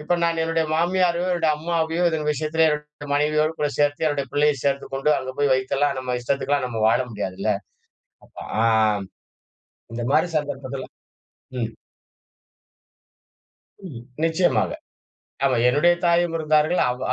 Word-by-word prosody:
இப்ப 170 +3 0
நான் 165 -1 0
என்னுடைய 165 0 0
மாமியாரையோ 175 +1 +1
என்னுடைய 165 -3 +2
அம்மாவையோ 165 +1 -1
இதன் 155 -1 -2
விஷயத்தில 155 +3 +1
என்னுடைய 150 -1 -5
மனைவியோடு 155 +2 +1
கூட 150 - +1
சேர்த்து 145 +2 +1
என்னுடைய 145 -3 -1
பிள்ளையை 145 0 +3
சேர்த்து 140 0 0
கொண்டு 135 +3 +1
அங்க 130 0 -5
போய் 145 -2 +3
வைத்தெல்லாம் 135 +2 0
நம்ம 125 -1 -2
இஷ்டத்துக்குலாம் 140 +2 0
நம்ம 115 -3 -3
வாழ 115 - +3
முடியாது 95 -3 -4
இல்ல? 110 - +1 0.7
அப்ப - - -25 0.3
ஆ - - +3 1.3
இந்த 120 +1 -4
மாரி 160 +3 +3
சந்தர்ப்பத்தில 135 -2 -4 0.8
ம். 115 -1 -2 2.2
ம். 125 -8 -9 0.2
நிச்சியமாக. 160 - +2 0.8
ஆமா 130 -2 +2
என்னுடைய 150 +7 +4
தாயும் 170 0 +2
இருந்தார்கள். 155 +2 +2
அவ் 125 +1 -3
150 Hz, 135 wpm, -23 LUFS, 135-160 Hz, 2.2 s, என்னுடைய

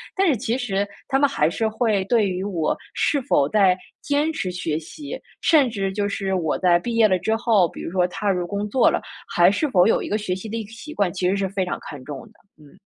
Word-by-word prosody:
但 390 - +2
是 300 - +3
其 235 +1 -1
实， 205 -6 -1 0.2
他 270 - +3
们 285 0 +4
还 155 - +2
是 220 +6 -1
会 220 -3 0
对 220 0 +2
于 185 0 -3
我 175 -6 -1 0.2
是 285 - +1
否 145 - +2
在 190 -2 +4 0.2
坚 290 +2 +1
持 220 -12 -3
学 165 -4 -2
习， 290 - -8 0.2
甚 295 -6 +4
至 195 -4 -2
就 205 0 -1
是 195 -1 -2
我 165 -5 0
在 175 -2 +4
毕 235 +6 -4
业 225 -1 +6
了 185 -2 +2
之 220 +5 0
后， 225 -5 +3
比 - - -10
如 - - -5
说 180 -1 +2
踏 205 +3 -2
入 180 -2 -1
工 205 +2 -3
作 255 +4 +4
了， - - -1 0.3
还 175 +1 +4
是 290 +9 0
否 180 -7 +4
有 - - +3
一 - - -5
个 210 - +1
学 210 -4 -2
习 190 +4 -7
的 225 - -3
一 225 - -3
个 210 - -14
习 290 +7 -9
惯， 200 -4 0
其 185 -2 -1
实 190 - +1
是 195 -1 0
非 190 -1 -1
常 180 - -3
看 145 -3 -9
重 140 -1 -7
的。 - - -21 0.3
嗯。 150 +5 -18
200 Hz, 280 characters per minute, -22 LUFS, 180-230 Hz, 0.3 s, 业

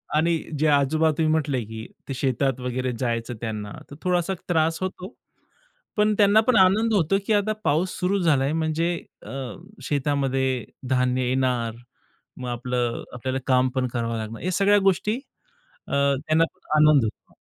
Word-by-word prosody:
आणि 165 +2 +3 0.2
जे 155 - +3
आजोबा 150 +2 +3
तुम्ही 155 -1 +2
म्हटले 140 -6 0
की 110 +1 -8 0.2
ते - - -1
शेतात 135 0 0
वगैरे 125 0 -2
जायचं 120 -1 -2
त्यांना, 105 -3 -4 0.2
तर 140 - -8
थोडासा 180 0 +1 0.2
त्रास 165 -1 +2
होतो. 185 +2 -5 0.8
पण 210 0 +3
त्यांना 205 +1 +6
पण 255 - +4
आनंद 210 +4 +4
होतो 195 0 +3
की 220 - +3
आता 210 +1 +2
पाऊस 165 +6 +1
सुरू 195 +2 +1
झाला 155 -7 +3
आहे 140 +3 0
म्हणजे 165 +2 0 0.3
अ, - - -8 0.5
शेतामध्ये 135 -3 0 0.2
धान्य 125 -1 +1
येणार. 125 -3 0 0.6
मग 125 - -6
आपलं 120 0 -2
आपल्याला 130 +2 -3
काम 130 -1 +3
पण 130 -1 +1
करावं 115 -1 -1
लागणार. 110 +1 -6
हे 185 - 0
सगळ्या 200 +3 +4
गोष्टी 210 +4 0 0.7
अ, - - -10 0.4
त्यांना 160 +1 +4 0.4
आनंद 150 -4 +6
होतो. 105 - -8
140 Hz, 155 wpm, -24 LUFS, 125-175 Hz, 0.8 s, त्यांना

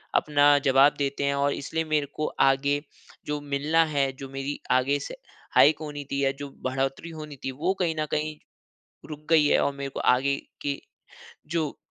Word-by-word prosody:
अपना 145 -1 +4
जवाब 135 +2 +6
देते 140 0 -1
हैं 140 0 +1
और 140 0 +1
इसलिए 160 +3 -3
मेरे 155 -2 +1
को 155 - -1 0.2
आगे 140 +2 +1 0.4
जो 150 0 -2
मिलना 145 +3 +2
है, 140 -3 0
जो 135 +1 -10
मेरी 135 +1 -4
आगे 130 +3 +2
से - - -7 0.4
हाइक 150 +1 +6
होनी 145 -1 -6
थी 140 0 0
या 135 - +3
जो 145 0 -6 0.2
बढ़ोतरी 135 +5 -2
होनी 155 -2 -8
थी, 135 - -1
वो 160 +8 -1
कहीं 165 -2 +1
न 155 - 0
कहीं 155 0 -2 0.7
रुक 150 0 -9
गई 155 -3 +5
है - - +4
और 140 - +1
मेरे 140 0 -5
को - - -6
आगे 135 +3 +3 0.3
के 140 -1 -2 0.8
जो 155 -4 -1
145 Hz, 185 wpm, -26 LUFS, 140-150 Hz, 0.8 s, जवाब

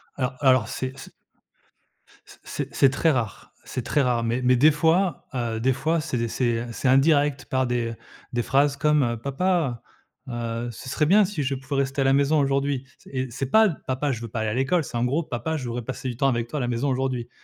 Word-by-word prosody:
Alors 130 -1 -2
alors 130 -5 +4
c'est 130 +1 -5
c - - -10 1.2
c - - -16
c - - -37
c'est - - -5
c'est 135 - +5
très 160 +5 +2
rare, 120 -7 -3
c'est 125 - -5
très 145 +4 +1
rare, 120 -3 +1
mais 120 +2 -1
mais 125 0 +4
des 150 +6 +6
fois, 165 +2 +1
heu, 115 -3 -2
des 130 +3 +2
fois 160 +4 0
c'est 125 -7 -2
c'est, 120 0 0
heu, 120 - -7
c'est 115 +4 -2
indirect 145 +1 +3
par 130 -1 0
des 120 -1 -1 0.4
des 120 - +1
phrases 140 +4 +2
comme, 150 -1 +3
heu: 120 -1 -1
«Papa, 140 -2 0 0.5
heu, 120 0 -3
ce 120 +4 -9
serait 150 +3 +1
bien 200 +6 +5
si 180 -6 -3
je 135 +1 -1
pouvais 135 +1 -2
rester 135 +1 -2
à - - +3
la 135 0 +3
maison 140 +2 +3
aujourd'hui» 140 -1 0
c - - -18
et 130 -1 -2
c'est 135 +2 -4
pas: 220 -1 +6 0.2
«Papa, 135 +2 0
je 120 -3 -4
veux 115 - -5
pas 110 0 -4
aller 110 - 0
à - - -2
l'école», 135 +8 +1
c'est 120 - -5
en 120 - +1
gros: 145 +7 0
«Papa, 145 +5 -3
je 130 - -5
voudrais 120 +1 -4
passer 130 +2 -5
du 120 - -6
temps 135 - +2
avec 120 -3 0
toi 150 - -5
à - - -1
la 120 - -1
maison 120 +4 -1
aujourd'hui», 130 -2 -2
130 Hz, 240 wpm, -24 LUFS, 120-145 Hz, 1.2 s, des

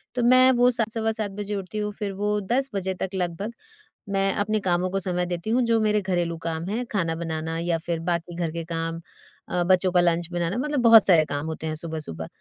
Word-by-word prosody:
तो 245 - 0
मैं 255 +1 +6
वो 245 0 +4
7 225 -2 0
सवा 225 -1 0
7 215 -3 -3
बजे 205 +1 -4
उठती 195 +2 -5
हूँ, 210 0 -1
फिर 205 -1 -4
वो 210 +1 0
10 260 +7 0
बजे 190 -1 -1
तक 190 - -1
लगभग 185 +5 -3 0.6
मैं 195 0 +1
अपने 215 +1 0
कामों 180 -1 0
को 195 +1 -1
समय 180 -2 -1
देती 175 +4 -4
हूँ, 245 +3 +3
जो 230 -1 +2
मेरे 210 -1 +2
घरेलू 175 -3 -1
काम 165 0 -2
हैं, 240 +4 -2
खाना 170 -6 0
बनाना 160 -1 -3
या 170 -1 0
फिर 170 -1 -1
बाकी 170 0 -2
घर 170 -2 -2
के 165 0 -4
काम, 165 0 -3 0.5
अ, 175 - 0
बच्चों 185 0 +3
का 175 -1 +4
लंच 170 -1 +1
बनाना, 175 +4 -1
मतलब 295 +1 -1
बहुत 225 -3 +8
सारे 165 -4 +5
काम 145 +1 -4
होते 160 0 -5
हैं 155 - -2
सुबह-सुबह। 160 - -6
185 Hz, 225 wpm, -25 LUFS, 170-215 Hz, 0.6 s, बहुत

